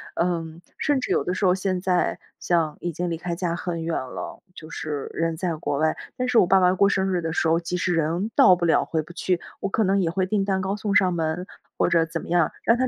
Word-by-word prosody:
嗯， 170 -1 -2 0.2
甚 290 -3 +1
至 250 - -3
有 - - +2
的 180 - -2
时 190 - -1
候 180 - +5
现 185 -1 -1
在， 180 -1 +1 0.2
像 165 -4 +1
已 175 - -2
经 175 +2 -3
离 165 - -1
开 175 +1 -4
家 170 -1 -2
很 175 -2 -4
远 165 0 -2
了， 130 -1 -6
就 155 - -10
是 150 -3 -4
人 165 -1 -1
在 175 -2 -1
国 145 -2 -2
外。 155 0 +2 0.2
但 255 -1 -1
是 250 -2 +2
我 - - +5
爸 195 +1 +5
爸 180 0 +4
过 200 +1 +4
生 190 -1 +1
日 175 - 0
的 165 - -2
时 170 - +1
候， 165 +1 +3
即 175 +1 -3
使 180 0 0
人 165 +5 0
到 185 - +7
不 175 - -1
了、 165 - +3
回 160 - -1
不 155 +3 -12
去， 180 0 0 0.2
我 195 - -1
可 220 +2 +1
能 195 +1 +2
也 170 - +1
会 185 +2 0
订 200 +1 0
蛋 190 -1 0
糕 190 +1 -1
送 210 -1 -2
上 185 -3 +4
门 165 +2 -2 0.3
或 - - +2
者 165 -1 +3
怎 165 0 -5
么 - - -10
样， 170 -2 +2
让 230 - +4
他 255 +1 +1
175 Hz, 290 characters per minute, -24 LUFS, 165-190 Hz, 0.3 s, 到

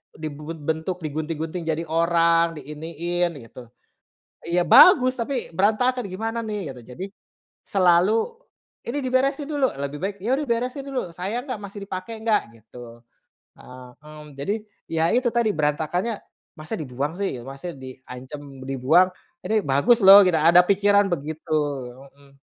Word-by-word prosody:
dibungun 155 +1 -7
bentuk 160 +4 -2
digunting-gunting 155 +3 -4
jadi 160 0 -1
orang 170 0 +2
di - - -7
iniin 170 +3 -2
gitu. 120 +2 -12 0.8
Ya 175 +1 +1
bagus 255 -8 +7
tapi 250 +1 -3
berantakan 235 +5 +1
gimana 225 +5 -3
nih 205 -10 -5
gitu 125 - -12
jadi, 180 +10 -6 0.6
selalu, 180 0 +3 0.7
"Ini 245 +5 -3
diberesin 275 +3 +1
dulu!" 285 -3 +1
lebih 140 +1 -4
baik, 195 +1 -2
"Ya 240 - 0
udah 300 - -3
beresin 250 +4 -2
dulu 255 -10 -3
sayang 205 +9 -4
enggak? 250 - -3
Masih 200 +1 -8
dipakai 195 +3 -6
enggak?" 220 -2 +2
gitu, 115 +1 -13 0.6
heeh, 125 0 -12 0.2
mmm, 150 0 -11
jadi 170 +9 -1 0.3
ya 160 0 0
itu 250 0 +2
tadi 235 -2 +2
berantakannya 160 +8 -1 0.4
masa 155 0 -6
dibuang 140 +2 -4
sih 160 -11 -2
masa 135 +6 -7
diancam 130 +1 -10 0.3
dibuang, 135 +8 +4 0.4
ini 215 +3 +1
bagus 140 - +4
loh 200 +1 +11
gitu 175 -3 +3
ada 170 +3 +6
pikiran 200 +1 +3
begitu, 155 0 -5 0.6
mhm. 140 0 -22
170 Hz, 140 wpm, -23 LUFS, 150-215 Hz, 0.8 s, loh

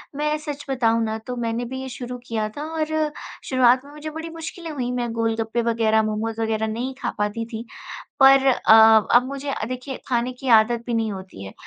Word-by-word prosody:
मैं 300 +1 0
सच 295 -1 -7
बताऊँ 230 -3 +2
ना, 220 0 -2
तो 250 +3 -7
मैंने 235 0 -2
भी 260 +2 -6
ये 265 - -6
शुरू 250 0 -6
किया 215 -2 -2
था 295 - -4 0.2
और 310 - +2 0.6
शुरुआत 255 0 +4
में 285 - -13
मुझे 300 +1 -7
बड़ी 320 +2 -7
मुश्किलें 330 0 -7
हुईं। 250 -4 -3
मैं 240 -2 -2
गोलगप्पे 225 0 -1 0.2
वगैरह, 220 0 +4
मोमोज़ 220 +1 -2
वगैरह 220 0 0
नहीं 245 +4 -3
खा - - -1
पाती 210 +2 -2
थी। 225 0 -7 0.5
पर 270 0 +7
अ, 220 -4 +6
अब 245 +1 +6
मुझे 275 +1 -5
अ, 240 - -2
देखिए, 255 +1 -5
खाने 245 0 0
की 255 +2 -9
आदत 235 +2 -1
भी 240 - -3
नहीं 225 -2 -1
होती 190 - -9
है। 95 - -9
240 Hz, 205 wpm, -23 LUFS, 225-270 Hz, 0.6 s, पर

